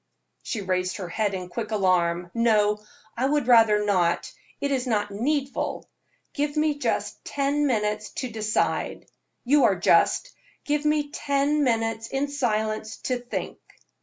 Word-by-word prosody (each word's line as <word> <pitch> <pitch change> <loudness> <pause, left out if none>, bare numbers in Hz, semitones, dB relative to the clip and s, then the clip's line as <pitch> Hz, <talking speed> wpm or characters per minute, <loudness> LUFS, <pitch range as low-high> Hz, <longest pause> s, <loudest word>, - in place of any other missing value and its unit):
She 220 - -4
raised 185 -1 -1
her 185 -4 -6
head 205 +1 -1
in 180 -1 -5
quick 210 +5 -5
alarm. 180 -4 +1
"No, 210 -3 +3 0.4
I 255 +3 +1
would 295 -2 +1
rather 225 -4 +5
not, 180 -4 +1 0.3
it 280 - -1
is 260 -2 0
not 205 -3 0
needful. 275 +6 -2 0.5
Give 290 +1 -2
me 300 -1 +1
just - - -2
ten 285 +1 0
minutes 210 -3 -1
to 255 -2 -4
decide. 215 -1 -1 0.4
You 285 +3 +5
are - - +4
just; - - +3 0.3
give 295 0 0
me 300 -1 +1
ten 285 +1 +1
minutes 225 -2 0
in 275 +3 -2
silence 220 -5 -1
to 255 -1 -1
think." 245 0 -5
230 Hz, 145 wpm, -25 LUFS, 210-280 Hz, 0.5 s, rather